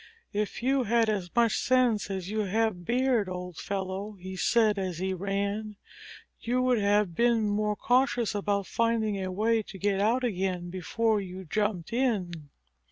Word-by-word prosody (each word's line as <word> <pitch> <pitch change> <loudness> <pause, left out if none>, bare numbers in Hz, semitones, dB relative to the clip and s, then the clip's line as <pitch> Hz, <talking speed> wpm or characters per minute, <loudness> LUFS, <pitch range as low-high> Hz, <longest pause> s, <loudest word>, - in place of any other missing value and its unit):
"If 210 +3 -2
you 265 0 +2
had 230 0 +3
as 195 -5 -1
much 235 -2 +3
sense 245 -5 +2
as 190 -2 -4
you 215 +2 -2
have 210 -2 0
beard, 245 -4 +1
old 180 -2 -6
fellow," 195 +1 -4
he 190 -1 -8
said 215 +2 +2
as 185 -3 -3
he 190 +2 -1
ran, 200 +3 -2 0.6
"you 245 +2 0
would 250 -2 +3
have 205 -2 +2
been 235 +2 +2
more 210 0 0
cautious 245 -1 +1
about 200 -1 -1
finding 220 -1 0
a 185 - -3
way 220 +4 +1
to 200 -2 -10
get 195 0 0
out 235 +5 +2
again 185 -5 -2
before 215 +4 0
you 190 0 -8
jumped 205 +1 -1
in." 185 - -1
205 Hz, 165 wpm, -28 LUFS, 190-230 Hz, 0.6 s, had